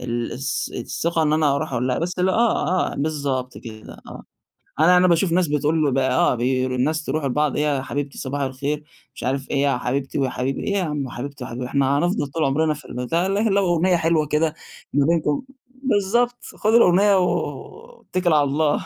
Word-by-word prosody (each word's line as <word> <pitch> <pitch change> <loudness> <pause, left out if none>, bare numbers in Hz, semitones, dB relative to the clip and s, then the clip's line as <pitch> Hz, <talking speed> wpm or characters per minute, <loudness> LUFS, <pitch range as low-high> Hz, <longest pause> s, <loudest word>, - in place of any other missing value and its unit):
ال 120 -1 -3
الث 135 +2 -3
الثِّقة 165 +7 -1
إن 150 -1 +2
أنا 155 -2 +3
أروح 155 0 -4
أقول 125 0 -1
لها، 125 - 0
بس 180 +2 -3
ل 180 +1 +2
آه، 190 -3 +1
آه، - - -6
بالضبط 140 -4 -2
كده 110 -2 -10
آه، - - -9 0.6
أنا 175 +3 +6
أنا 180 +1 +5
باشوف 170 0 +2
ناس 180 0 +2
بتقول 150 -1 +1
آه، 130 -1 +2
بي 130 +2 0
آآ - - -1
الناس 150 +5 -1
يروحوا 150 0 -1
لبعض 150 +2 0
إيه 150 - +1
يا 140 -3 0
حبيبتي 140 +1 -4
صباح 140 +2 -3
الخير، 140 +3 -3 0.3
مش - - -8
عارف 135 +1 -2
إيه - - -1
يا 140 -3 +2
حبيبتي 135 +3 -2
ويا 135 -1 +1
حبيبي، 130 +2 -3
إيه 200 - -1
يا 195 - +1
عم 150 -5 -3
حبيبتي 140 +3 -7
وحبيبي، 125 0 -5
إحنا 140 +1 +1
هنفضل 170 -2 0
طول 155 +3 -2
عمرنا 155 +3 +1
في 150 -2 -12
البتاع، 145 +10 -1
لكن 205 +2 +1
لو 200 0 +2
أُغنية 175 +1 +2
حلوة 160 -2 +1
كده 155 +1 +1 0.4
ما 140 0 +3
بينكم، 155 -2 +1 0.4
بالضبط 240 +2 +1
خُد 215 +1 0
الأغنية 200 -2 +5
و 460 - -3
اتَّكِل 180 -2 0
على 150 -1 +4
الله. 145 +2 0
150 Hz, 200 wpm, -22 LUFS, 135-175 Hz, 0.6 s, أنا